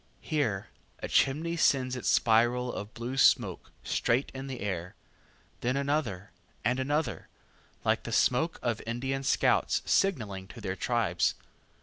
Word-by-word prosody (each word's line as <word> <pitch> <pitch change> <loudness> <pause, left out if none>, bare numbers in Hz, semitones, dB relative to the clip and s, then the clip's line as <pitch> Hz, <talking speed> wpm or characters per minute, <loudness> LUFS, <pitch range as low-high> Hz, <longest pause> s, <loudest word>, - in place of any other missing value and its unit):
Here 120 - -1 0.3
a - - -5
chimney 160 +5 +2
sends 130 -5 +2
its 125 - -2
spiral 120 +2 +3
of 105 +2 -7
blue 120 +3 -4
smoke 110 -9 +3
straight 125 +4 0
in 135 +1 -6
air; 95 -8 -4 0.6
then 125 +3 0
another, 140 -10 -1 0.3
and 125 +3 +2
another, 145 +4 -1 0.6
like - - +2
the - - -7
smoke 145 +7 +2
of 120 -2 -1
Indian 135 +4 -2
scouts 135 - +2
signaling 105 - 0
to 115 - -11
their 95 -3 -3
tribes. 110 -5 +1
125 Hz, 130 wpm, -29 LUFS, 105-135 Hz, 0.6 s, spiral